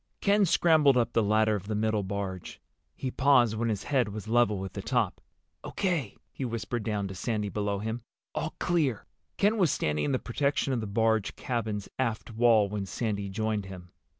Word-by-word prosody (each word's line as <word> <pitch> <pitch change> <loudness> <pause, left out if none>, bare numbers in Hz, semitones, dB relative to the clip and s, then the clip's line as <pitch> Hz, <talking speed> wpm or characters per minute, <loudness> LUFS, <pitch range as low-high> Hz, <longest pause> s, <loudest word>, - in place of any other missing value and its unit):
Ken 200 0 +3
scrambled 155 -6 +4
up 120 -1 +1
the 115 - +3
ladder 110 +1 +3
of 100 -1 -6
the 110 - -2
middle 110 0 +1
barge. 95 -2 -5 0.4
He 130 - -4
paused 125 -5 +4
when 115 +1 -1
his 100 -3 -2
head 130 -6 +1
was 105 +1 -7
level 115 -3 +3
with 95 -1 -5
the - - -5
top. - - 0 0.4
"O.K.," 170 - -2 0.2
he - - -5
whispered 115 -1 -3
down 105 -2 -2
to 95 - -6
Sandy 105 +2 -2
below 100 0 -1
him. 110 +4 -4 0.3
"All 155 - -3
clear." 150 - 0 0.3
Ken 210 +2 +2
was 180 -5 +4
standing 75 - 0
in 145 - 0
the 130 - +2
protection 140 +3 0
of 120 - -1
the 110 - -4
barge 110 0 +1
cabin's 110 -6 -3
aft 115 -3 -2
wall 115 -2 +4
when 100 -1 -4
Sandy 100 0 -2
joined 110 0 -1
him. 90 -2 -10
110 Hz, 190 wpm, -28 LUFS, 100-125 Hz, 0.4 s, scrambled